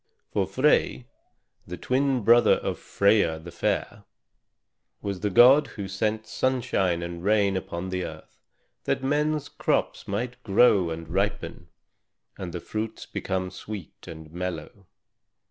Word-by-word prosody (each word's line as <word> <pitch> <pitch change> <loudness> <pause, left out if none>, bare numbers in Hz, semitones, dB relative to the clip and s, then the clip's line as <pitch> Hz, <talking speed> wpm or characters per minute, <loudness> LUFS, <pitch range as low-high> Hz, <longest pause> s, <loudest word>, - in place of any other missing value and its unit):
For - - 0
Frey, 60 0 +2 0.6
the 90 +1 -6
twin 130 -2 0
brother 120 +3 +6
of - - -4
Freia 100 -5 +2
the 85 +2 -10
fair, 100 +3 -2 1.0
was 100 -2 -4
the 105 - -1
god 125 +9 +7
who 100 -2 -4
sent 110 +3 -2
sunshine 100 -9 0
and 85 0 -6
rain 100 -1 +3
upon 95 0 -4
the 90 -1 -2
earth - - -11 0.5
that - - -1
men's 150 +1 0
crops - - -1
might 125 +5 -3
grow 100 -4 +4
and 80 0 -6
ripen, 100 +5 -2 0.7
and 90 -2 -6
the 85 - -5
fruits 110 +5 -5
become 95 -1 -3
sweet 105 -6 -9
and 80 -1 -10
mellow. 90 +2 -6
100 Hz, 130 wpm, -26 LUFS, 90-115 Hz, 1.0 s, god